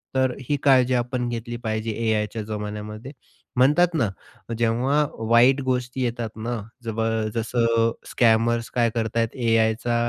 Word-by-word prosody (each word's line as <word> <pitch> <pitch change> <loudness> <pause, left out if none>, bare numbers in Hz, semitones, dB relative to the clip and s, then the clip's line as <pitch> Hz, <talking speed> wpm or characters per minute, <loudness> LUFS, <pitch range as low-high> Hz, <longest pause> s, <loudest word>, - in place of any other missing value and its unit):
तर 130 -1 +2
अ, - - -8
ही 145 - +2
काळजी 130 -2 +4
आपण 125 0 -1
घेतली 120 0 -5
पाहिजे 110 0 -2 0.2
AIच्या 105 +1 -2
जमान्यामध्ये, 105 +3 -6 0.5
म्हणतात 160 +7 +4
ना 115 -9 +2 0.5
जेव्हा 125 +6 +2 0.2
वाईट 125 +4 +5
गोष्टी 125 0 -1
येतात 120 -2 -2 0.2
ना 120 - -1 0.3
जब 115 -1 -3 0.3
जसं 115 0 +1 0.2
स्कॅमर्स 115 0 +2
काय 120 -1 +2
करतायेत, 115 0 0
AIचा 115 0 +1
120 Hz, 130 wpm, -24 LUFS, 115-125 Hz, 0.5 s, वाईट